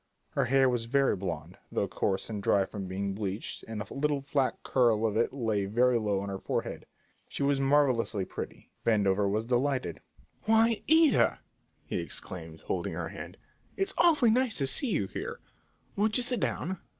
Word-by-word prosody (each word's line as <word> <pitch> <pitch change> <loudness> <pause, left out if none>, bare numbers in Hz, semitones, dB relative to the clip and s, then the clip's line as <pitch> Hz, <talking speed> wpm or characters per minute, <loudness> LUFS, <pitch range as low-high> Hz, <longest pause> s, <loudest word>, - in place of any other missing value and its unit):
Her - - +1
hair 135 +1 +4
was 120 -2 0
very 135 0 +2
blond, 85 -3 -5
though - - 0
coarse 95 -1 -1
and 105 -3 -4
dry 100 0 +3
from 100 -1 -6
being 100 +1 -3
bleached, 100 0 -4
and 110 -1 -5
a 100 - -11
little 145 0 0
flat 140 -1 0
curl 115 -4 +2
of 110 -2 0
it 115 - +2
lay 110 -6 -1
very 120 +4 +3
low 105 -3 0
on 100 - -5
her 95 -1 -4
forehead. - - -3 0.4
She - - -3
was 140 -1 +2
marvellously 130 -8 +2
pretty. - - -8
Vandover 100 -3 +2
was 110 +3 -1
delighted. 125 - 0 0.5
"Why, 225 +1 +3
Ida!" 320 -1 +4 0.4
he - - -2
exclaimed, - - -5
holding - - -3
her - - -4
hand; - - -9 0.4
"it's 390 0 -1
awfully 305 -9 +4
nice 250 0 +2
to 140 - +2
see 235 - +3
you 140 - +1
here; - - -6 0.6
won't 215 +3 +2
you 250 - +2
sit 245 -1 +1
down?" 185 -1 -2
120 Hz, 175 wpm, -29 LUFS, 100-145 Hz, 0.6 s, hair